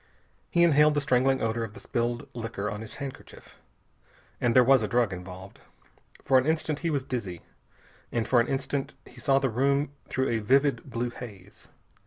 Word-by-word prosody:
He 170 Hz, -, +3 dB
inhaled 150 Hz, -2 st, +5 dB
the -, -, +3 dB
strangling 135 Hz, -1 st, +2 dB
odor 115 Hz, +1 st, 0 dB
of 110 Hz, -1 st, -7 dB
the -, -, -9 dB
spilled 120 Hz, 0 st, -2 dB
liquor 110 Hz, -3 st, -4 dB
on 105 Hz, -, -5 dB
his 110 Hz, -, -9 dB
handkerchief. 140 Hz, -2 st, -9 dB, 0.8 s
And 120 Hz, -1 st, +2 dB
there 125 Hz, -, +8 dB
was 135 Hz, 0 st, +5 dB
a 105 Hz, -, -1 dB
drug 120 Hz, -4 st, +1 dB
involved. 90 Hz, +1 st, -9 dB, 0.7 s
For 130 Hz, -1 st, +5 dB
an 130 Hz, -, -2 dB
instant 155 Hz, -1 st, 0 dB
he 170 Hz, -, -1 dB
was 140 Hz, -4 st, 0 dB
dizzy, 100 Hz, -10 st, -5 dB, 0.7 s
and 115 Hz, -2 st, -1 dB
for 120 Hz, -2 st, +4 dB
an -, -, -1 dB
instant 135 Hz, 0 st, -2 dB
he 125 Hz, -, -15 dB
saw 135 Hz, +2 st, +3 dB
the 135 Hz, -2 st, +1 dB
room 140 Hz, +4 st, +1 dB, 0.2 s
through 130 Hz, +1 st, 0 dB
a 115 Hz, -, +1 dB
vivid 135 Hz, +6 st, +2 dB
blue 120 Hz, 0 st, -2 dB
haze. 100 Hz, -6 st, -11 dB
125 Hz, 185 wpm, -27 LUFS, 115-140 Hz, 0.8 s, there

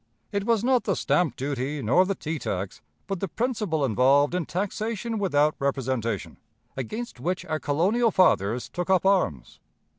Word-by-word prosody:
It 200 Hz, -1 st, -1 dB
was 230 Hz, -2 st, +2 dB
not 255 Hz, -1 st, +2 dB
the 195 Hz, -, +1 dB
stamp 160 Hz, -9 st, +1 dB
duty 140 Hz, +1 st, -3 dB
nor 175 Hz, +12 st, +4 dB
the 195 Hz, -, -1 dB
tea 160 Hz, -2 st, -4 dB
tax, 95 Hz, -4 st, -4 dB, 0.2 s
but 195 Hz, -2 st, -3 dB
the 195 Hz, -, -2 dB
principle 210 Hz, -, -1 dB
involved 135 Hz, +6 st, +3 dB
in 180 Hz, -4 st, -1 dB
taxation 215 Hz, +4 st, -3 dB
without 155 Hz, -6 st, +2 dB
representation, 130 Hz, -6 st, -2 dB, 0.4 s
against 215 Hz, -, -5 dB
which 180 Hz, +7 st, -2 dB
our 155 Hz, -3 st, -2 dB
colonial 190 Hz, +12 st, +2 dB
fathers 125 Hz, -, +2 dB
took 175 Hz, +1 st, -4 dB
up 190 Hz, -1 st, +3 dB
arms. 180 Hz, -, +1 dB
170 Hz, 155 wpm, -26 LUFS, 135-200 Hz, 0.4 s, nor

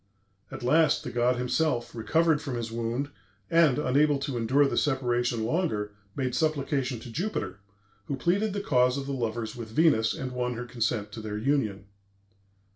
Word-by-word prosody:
At -, -, -8 dB
last 155 Hz, +5 st, +3 dB
the 125 Hz, -, -5 dB
god 120 Hz, +1 st, +2 dB
himself, 125 Hz, 0 st, 0 dB
recovered 160 Hz, +6 st, +2 dB
from 135 Hz, -5 st, -4 dB
his 115 Hz, -1 st, -4 dB
wound, 120 Hz, +5 st, -2 dB, 0.4 s
and, 165 Hz, -5 st, +5 dB
unable 145 Hz, +1 st, +3 dB
to 140 Hz, -1 st, -4 dB
endure 125 Hz, +5 st, +3 dB
the 140 Hz, -, -1 dB
separation 120 Hz, -4 st, +1 dB
longer, 110 Hz, -, -1 dB, 0.2 s
made 130 Hz, -2 st, -1 dB
supplication 140 Hz, -5 st, 0 dB
to 120 Hz, -, -9 dB
Jupiter, 115 Hz, -, -3 dB, 0.5 s
who 140 Hz, -, -2 dB
pleaded 195 Hz, +9 st, +1 dB
the 200 Hz, -, -2 dB
cause 125 Hz, -6 st, +3 dB
of 140 Hz, -, -3 dB
the 140 Hz, -, -3 dB
lovers 115 Hz, -3 st, -3 dB
with 115 Hz, -2 st, -7 dB
Venus, 115 Hz, -4 st, +3 dB
and 130 Hz, -1 st, -4 dB
won 125 Hz, -1 st, -2 dB
her 120 Hz, +2 st, -5 dB
consent 115 Hz, -3 st, -2 dB
to 110 Hz, -, -7 dB
their 105 Hz, -1 st, -4 dB
union. 110 Hz, -5 st, 0 dB
125 Hz, 170 wpm, -28 LUFS, 115-145 Hz, 0.5 s, and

